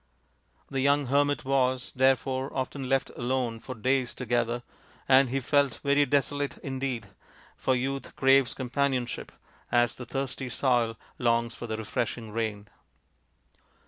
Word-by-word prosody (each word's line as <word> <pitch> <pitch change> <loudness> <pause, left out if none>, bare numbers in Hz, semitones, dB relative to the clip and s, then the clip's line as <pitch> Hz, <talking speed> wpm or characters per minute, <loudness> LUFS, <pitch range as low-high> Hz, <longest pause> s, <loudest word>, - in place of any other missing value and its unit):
The 135 - -3
young 140 +1 +3
hermit 145 -2 +2
was, 130 -2 +1
therefore, 130 +1 +2
often 130 0 -3
left 135 -1 +1
alone 120 -2 -1
for 130 +3 -7
days 130 +2 0
together, 120 -1 -1 0.4
and 130 -1 +6
he 135 +2 0
felt 140 -1 +2
very 145 0 +3
desolate 145 +1 0
indeed, 130 -5 -3 0.5
for 130 - +1
youth 135 +2 -3
craves 135 -1 +4
companionship 130 -1 -1 0.4
as 120 -1 +3
the 125 - -9
thirsty 135 0 -3
soil 120 -3 +1 0.2
longs 115 -1 +2
for 120 - -7
the 110 -1 -3
refreshing 110 +1 -3
rain. 105 -2 -3
130 Hz, 130 wpm, -28 LUFS, 120-135 Hz, 0.5 s, and